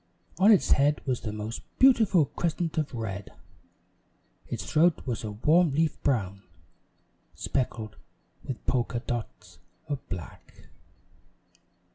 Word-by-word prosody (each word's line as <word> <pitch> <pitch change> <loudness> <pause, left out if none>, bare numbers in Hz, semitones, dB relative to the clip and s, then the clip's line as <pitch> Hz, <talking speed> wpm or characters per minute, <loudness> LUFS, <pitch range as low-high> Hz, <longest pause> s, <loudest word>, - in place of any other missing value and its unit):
On 200 +4 +7
its 205 - +4
head 145 +1 +4
was 130 -4 -1
the 110 - -4
most 105 +2 -5 0.2
beautiful 220 - +5
crescent 170 +2 -2
of 150 - -2
red. 105 -4 -5 1.1
Its - - -5
throat 170 +2 +2
was 125 -3 -3
a 110 - -3
warm 155 +8 +3
leaf 160 +1 0
brown, 100 -8 0 0.9
specked 115 -5 -3 0.5
with 130 - -6
polka 120 -1 0
dots 115 - -6 0.3
of 145 -2 -2
black. 90 -2 -9
130 Hz, 115 wpm, -28 LUFS, 110-160 Hz, 1.1 s, On